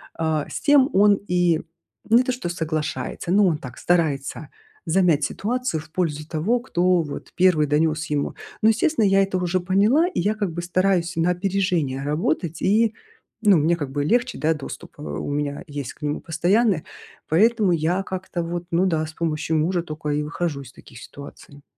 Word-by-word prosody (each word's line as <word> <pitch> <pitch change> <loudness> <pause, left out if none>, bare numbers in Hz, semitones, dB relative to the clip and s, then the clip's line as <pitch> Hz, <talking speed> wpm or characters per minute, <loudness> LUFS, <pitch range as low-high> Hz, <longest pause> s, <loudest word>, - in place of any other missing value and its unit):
а, 160 -2 -1
с - - -5
тем 285 -2 +5
он 200 +1 +5
и 175 -2 +2 0.5
не 235 +3 +6
то, 255 0 -1
что 245 -8 -4
соглашается, 160 0 -3
но 205 +2 +5
он 165 -4 +1
так 125 -4 -10
старается 155 -4 0 0.4
замять 170 -3 +2
ситуацию 245 -5 -2
в 155 - -16
пользу 155 -4 -2
того, 170 +10 0
кто 180 -7 +1
вот 145 - -8
1 175 -5 +4
донес 155 +2 +1
ему. 145 -1 -1 0.3
Но, 215 - +4
естественно, 225 +2 +2
я 195 0 +4
это 195 -1 -1
уже 180 0 0
поняла, 205 - +3
и - - -3
я 210 +4 +1
как 205 -4 -2
бы 170 +2 -4
стараюсь 180 0 0
на 165 +1 +1
опережение 180 -7 -1
работать, 155 +2 -1
и, 220 +2 +3 0.5
ну, 200 -4 +6
мне 160 +3 +2
как 145 -5 -5
бы 145 +1 -1
легче, 245 - +1
да, 160 +1 +2
доступ, 150 -3 -9
э, - - -8
у 75 - -4
меня 145 +1 -2
есть 145 -3 -6
к - - -28
нему 150 0 -2
постоянный, 175 +3 +1 0.5
поэтому 210 +3 +3
я 170 +4 0
как-то 185 -2 -4
вот, 175 +1 -4
ну 170 +3 +2
да, 160 -4 0
с 155 - -9
помощью 160 -1 -1
мужа 170 +3 0
тока 155 -2 -6
и 150 - 0
выхожу 150 -1 -3
из 130 -2 -12
таких 115 - -14
ситуаций. 140 0 -12
170 Hz, 185 wpm, -23 LUFS, 155-195 Hz, 0.5 s, не